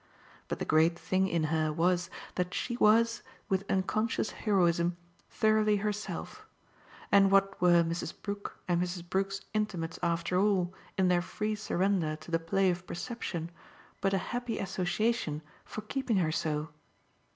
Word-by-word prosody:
But - - -3
the - - -3
great 160 +2 +4
thing 190 +2 +1
in 170 -3 0
her 155 -1 +1
was 175 +2 +1 0.2
that 180 0 -2
she 240 - -2
was, 230 +1 +4 0.3
with 195 0 0
unconscious 215 +4 0
heroism, 175 -4 +2 0.3
thoroughly 215 -2 +3
herself; 210 +1 -4 0.6
and 195 -1 +6
what 195 -1 +3
were 175 -1 +6
Mrs. 170 +1 -3
Brook 200 0 -5
and 175 -1 +2
Mrs. 175 -1 -3
Brook's 195 +2 -1
intimates 185 -6 -2
after 170 +1 +1
all, 190 -3 +2 0.2
in 190 -1 +3
their 180 -1 +3
free 210 +4 -2
surrender 190 -5 0
to 155 +2 -12
the 165 - +2
play 185 +3 +2
of 175 0 -6
perception, 175 -4 -4 0.5
but 195 -1 +2
a 190 - -3
happy 245 -1 -2
association 190 -3 -1 0.2
for 215 - -6
keeping 240 -1 -1
her 165 -4 +2
so? 155 -1 -1
185 Hz, 150 wpm, -31 LUFS, 170-210 Hz, 0.6 s, and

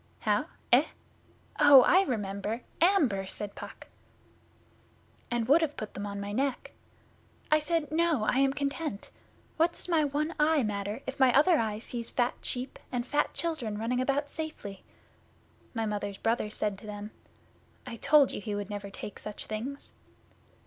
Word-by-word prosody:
'How? - - +1 0.3
Eh? - - +7 0.7
Oh, 290 -3 +9
I 370 - +6
remember! 210 - -2 0.2
Amber,' 280 - +3
said 205 +1 -5
Puck. - - -10 1.4
'And 240 -2 -1
would 300 +5 +6
have 300 -2 -1
put 215 - -6
them 205 +1 -5
on 200 0 -5
my 200 0 -4
neck. 265 +4 -1 0.8
I 305 - +6
said, 310 0 -1
"No, 320 -6 +2
I 250 +4 +2
am 275 0 +4
content. 280 -4 -3 0.5
What 335 +2 +3
does - - -11
my 330 -3 +3
one 300 +3 -1
eye 300 -2 +4
matter 205 +3 -3
if 265 +1 -6
my 260 -2 +6
other 325 +3 +5
eye 215 -2 -1
sees 235 +1 -5
fat 245 0 +1
sheep 250 +1 -4
and 240 -1 -2
fat 290 +3 0
children 290 -11 -2
running 240 +3 0
about 280 +2 0
safely?" 305 -12 -6 0.9
My 225 -1 0
Mother's 205 -2 -3
brother 225 0 0
said 210 -2 -2
to 215 - -12
them, 210 0 -6 0.7
"I 230 - -7
told 285 +2 +5
you - - -5
he 210 0 -3
would 205 0 -4
never 205 -1 -5
take 195 +1 -8
such 210 -1 -6
things." 245 +6 -5
245 Hz, 165 wpm, -29 LUFS, 210-295 Hz, 1.4 s, Oh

